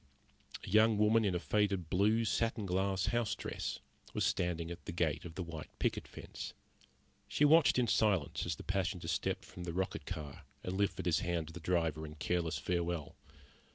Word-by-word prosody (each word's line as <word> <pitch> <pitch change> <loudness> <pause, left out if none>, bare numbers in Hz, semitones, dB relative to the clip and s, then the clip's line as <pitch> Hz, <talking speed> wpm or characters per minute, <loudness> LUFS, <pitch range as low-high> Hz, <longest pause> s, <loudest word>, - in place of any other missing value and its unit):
A - - -10
young 110 +2 +5
woman 110 +2 +4
in 95 -4 +1
a - - +1
faded 100 -3 +1
blue 105 +5 +3
satin 115 -1 0
glass 95 +1 +1
house 115 -3 +1
dress - - -4 0.4
was - - +2
standing 85 -1 0
at 85 - -8
the - - -4
gate 80 -2 0
of 80 -2 -8
the 95 - -3
white 80 -3 -7
picket - - -1
fence. - - -8 0.7
She 140 +8 +3
watched 155 -1 +6
in 125 - +4
silence 105 -8 +2
as 85 - -1
the - - -10
passenger 95 -2 -1
stepped 85 - -1
from 90 - -9
the 85 -1 -4
rocket 95 +2 -2
car 75 -5 -6 0.2
and 90 - -3
lifted 100 0 0
his 85 -3 +3
hand 85 -2 -1
to - - -11
the 85 - -7
driver 80 -2 0
in 75 -1 -7
careless 85 -1 0
farewell. 85 0 -2
90 Hz, 190 wpm, -34 LUFS, 85-105 Hz, 0.7 s, watched